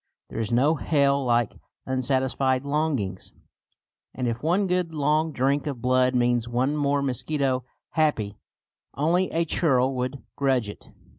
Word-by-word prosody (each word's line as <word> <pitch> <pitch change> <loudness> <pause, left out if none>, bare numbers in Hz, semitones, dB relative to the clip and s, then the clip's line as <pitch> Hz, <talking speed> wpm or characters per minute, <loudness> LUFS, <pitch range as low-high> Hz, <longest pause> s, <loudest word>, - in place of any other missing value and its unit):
There - - -4
is 110 -1 -2
no 135 +6 +4
hell 140 -2 +2
like 120 -3 +1 0.3
unsatisfied 130 0 0
longings; 140 -9 -2 0.8
and 125 -1 -2
if 115 +1 -2
one 180 +6 +2
good 180 -3 -1
long 155 +2 +1
drink 140 +2 0
of 140 -4 -4
blood 130 +1 +2
means 120 -1 +2
one 125 +5 0
more 145 -1 +1
mosquito 135 0 -1 0.3
happy, 115 -11 0 0.6
only 170 +6 +1
a 165 +1 0
churl 135 -5 +2
would 130 +2 -3
grudge 130 -6 +1
it. - - -11
135 Hz, 140 wpm, -25 LUFS, 125-150 Hz, 0.8 s, no